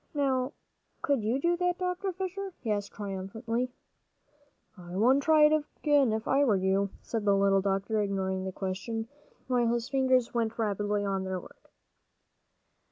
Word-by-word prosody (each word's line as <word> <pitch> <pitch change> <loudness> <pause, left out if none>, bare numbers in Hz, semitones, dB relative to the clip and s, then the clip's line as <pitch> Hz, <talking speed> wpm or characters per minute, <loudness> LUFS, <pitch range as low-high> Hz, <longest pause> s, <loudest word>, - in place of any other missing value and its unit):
Now 265 -1 +1 0.5
could 280 -4 +2
you 230 +5 +1
do 345 +4 +2
that, 360 0 0
Dr. 365 +1 -2
Fisher?" 380 +1 -5
he 225 - -2
asked 205 -1 -2
triumphantly. 220 +5 -3 1.1
"I 175 -2 -9
wouldn't 255 +7 +4
try 310 +1 +5
it 300 0 +6 0.2
again, 290 -5 +3
if 220 0 -2
I 275 +1 +3
were 230 -7 +3
you," 190 +1 +1
said 225 -2 -3
the 200 -1 +4
little 195 0 +3
doctor, 200 +2 0
ignoring 190 -2 -1
the 190 - -3
question, 205 +5 -4 0.4
while 245 -2 +2
his 235 +1 -1
fingers 260 -3 +2
went 230 -2 -1
rapidly 205 -1 0
on 195 -1 -1
their 190 -1 -3
work. - - -16
225 Hz, 160 wpm, -29 LUFS, 195-270 Hz, 1.1 s, it